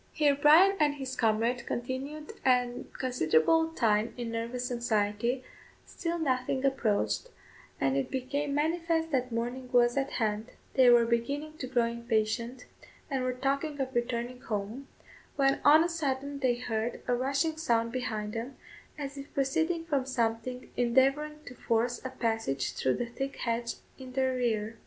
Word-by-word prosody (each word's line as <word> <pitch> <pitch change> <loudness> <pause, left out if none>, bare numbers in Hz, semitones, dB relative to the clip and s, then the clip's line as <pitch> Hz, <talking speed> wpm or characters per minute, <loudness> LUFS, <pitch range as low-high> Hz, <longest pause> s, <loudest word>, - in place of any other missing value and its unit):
Here 295 -2 +4
Bryan 320 +7 +6
and 295 -2 +3
his 265 -2 -5
comrade 230 +1 +1
continued 270 +5 -4
a 250 -1 +2
considerable 250 - +3
time 220 -7 +1
in 240 -2 -4
nervous 235 +2 -3
anxiety, 235 +1 0 0.4
still 340 -1 -3
nothing 260 -3 0
approached, 265 - 0 0.5
and 135 0 +1
it 135 - 0
became 280 +2 -2
manifest 325 +1 0
that 255 -2 0
morning 245 +2 -3
was 240 -1 +4
at 275 0 -1
hand; 220 0 -1 0.2
they 255 -2 +6
were 240 -1 +6
beginning 280 +7 -1
to 255 - -4
grow 245 -2 +2
impatient, 235 +1 -1 0.5
and 265 -2 0
were 255 - +1
talking 280 +4 -1
of 265 -1 -2
returning 240 +1 -2
home, 215 +5 -4 0.5
when 275 -1 +2
on 310 +2 +7
a - - +1
sudden 280 -3 -2
they 255 -3 +2
heard 230 -1 -3
a 250 - +2
rushing 275 +6 0
sound 230 -7 +1
behind 220 -4 -3
them, 240 +4 -5 0.4
as 280 -1 -5
if 275 - -10
proceeding 320 +5 0
from 280 -5 0
something 250 0 -2
endeavouring 275 +5 +2
to 250 - -8
force 235 0 0
a 260 - -3
passage 225 - -1
through 130 - +1
the 240 - -2
thick 270 +4 -5
hedge 235 0 -2 0.2
in 260 -1 -9
their 260 0 +1
rear. 225 -3 -1
255 Hz, 155 wpm, -30 LUFS, 235-280 Hz, 0.5 s, on